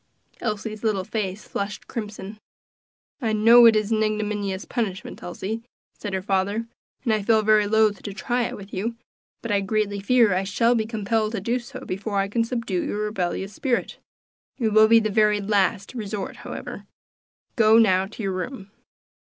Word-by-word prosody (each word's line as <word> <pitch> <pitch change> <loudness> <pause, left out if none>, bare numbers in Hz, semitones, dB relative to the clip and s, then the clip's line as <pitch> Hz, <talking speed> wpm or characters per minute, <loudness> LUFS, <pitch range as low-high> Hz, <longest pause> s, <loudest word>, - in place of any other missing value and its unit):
Elsie's 215 -1 -4
little 210 -4 +1
face 210 -1 -4
flushed 200 0 -4
crimson. 210 -2 -6 0.8
"I 225 -3 0
know 230 +3 +8
it 225 - +6
is 215 0 0
an 220 -1 +2
ignominious 210 -2 -1
punishment, 210 -6 -4
Elsie," 205 +5 -5 0.3
said 205 - -6
her 190 -1 -2
father, 200 +3 0 0.4
"and 235 -4 +2
I 215 - +1
feel 220 +1 +3
very 210 -1 +4
loth 215 -1 +3
to 205 - -6
try 240 +4 -1
it - - -5
with 200 0 -12
you, 225 +5 -2 0.5
but 230 - -3
I 200 -1 +2
greatly 205 0 -1
fear 225 0 +4
I 185 +1 +1
shall 230 +5 +2
be 220 -2 0
compelled 220 0 -1
to 220 - -1
do 235 +6 -1
so 255 +2 -10
before 200 +2 -3
I 195 0 +1
can 230 +3 +1
subdue 230 -6 -2
your - - -3
rebellious 195 -2 -2
spirit; 250 +3 -2 0.6
it 230 -4 +1
will 215 +1 +6
be 230 +1 +7
the 215 -1 -1
very 210 0 +3
last 200 0 0
resort, 210 -4 -5
however. - - -8 0.7
Go 220 -2 +6
now 190 -4 +4
to 220 +2 -8
your 195 -1 -1
room." 195 +1 -6
215 Hz, 175 wpm, -24 LUFS, 200-225 Hz, 0.8 s, know